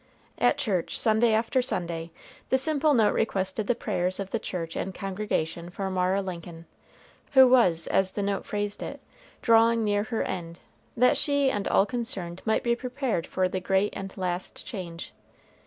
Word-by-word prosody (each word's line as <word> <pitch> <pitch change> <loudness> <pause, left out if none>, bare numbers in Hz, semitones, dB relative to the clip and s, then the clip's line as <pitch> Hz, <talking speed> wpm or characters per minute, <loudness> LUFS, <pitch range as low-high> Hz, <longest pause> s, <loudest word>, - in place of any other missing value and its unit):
At - - +3
church, 205 - -1
Sunday 220 +1 +3
after 225 +4 +2
Sunday, 170 -8 -3 0.4
the 260 - +4
simple 295 +1 +2
note 220 -3 +4
requested 195 -1 -1
the 245 - +2
prayers 185 -4 -1
of 195 -1 -5
the 230 - 0
church 165 -5 -5
and 190 -1 -4
congregation 185 -4 -3
for 190 +2 -4
Mara 185 +1 +1
Lincoln, 170 -2 -7 0.7
who 265 -1 +8
was, 185 -11 +4
as 190 -1 +1
the 205 - -2
note 200 0 -1
phrased 205 0 -3
it, - - -6 0.4
drawing 230 0 +4
near 205 0 +1
her 225 0 -1
end, 170 -2 -5 0.4
that 250 +4 +4
she 285 -1 +2
and 205 -1 -2
all 195 - +4
concerned 195 -6 -4
might 220 - +1
be 235 0 +2
prepared 250 - -2
for 185 -1 0
the 185 +1 -3
great 195 +2 +1
and 195 0 -7
last 180 -1 -3
change. 175 -5 -7
200 Hz, 170 wpm, -27 LUFS, 180-230 Hz, 0.7 s, who